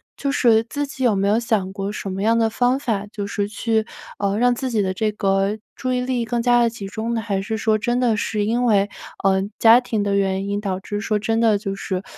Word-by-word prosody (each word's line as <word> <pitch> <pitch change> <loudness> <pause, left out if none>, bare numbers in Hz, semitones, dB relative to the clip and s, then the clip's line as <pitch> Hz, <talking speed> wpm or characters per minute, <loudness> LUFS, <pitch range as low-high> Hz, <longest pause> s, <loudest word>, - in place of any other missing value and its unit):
就 280 - -2
是 225 -5 +4
自 285 +5 -3
己 265 -2 -6
有 235 -4 +4
没 195 +1 +1
有 210 +2 +3
想 215 -5 -1
过 200 0 -3
什 200 -2 -5
么 190 +2 -3
样 230 +1 +3
的 225 -1 +2
方 250 +4 +1
法， 215 -7 -2
就 205 -1 -5
是 200 0 -2
去 220 0 0 0.3
呃， 200 0 0
让 245 +1 +3
自 260 +2 -3
己 215 -2 +1
的 190 -1 -1
这 215 +3 0
个 195 +1 0 0.2
注 255 -2 -2
意 250 - 0
力 250 -2 -1
更 235 +1 -1
加 240 0 +4
地 235 - +3
集 210 -4 -8
中 225 +3 -3
呢， 225 - -1
还 200 -3 -2
是 220 +2 -3
说 220 -1 +2
真 240 +3 0
的 230 -4 +2
是 210 0 -1
因 240 +4 0
为， 205 -3 +3 0.3
呃， 190 -1 +3 0.2
家 230 +2 +7
庭 225 -4 -2
的 200 -1 0
原 195 0 0
因， 205 0 -1
导 195 -3 -2
致 205 +2 -4
说 210 +1 0
真 225 +2 0
的 220 -3 +4
就 200 -1 -4
是 190 -1 -4
220 Hz, 270 characters per minute, -21 LUFS, 200-235 Hz, 0.3 s, 家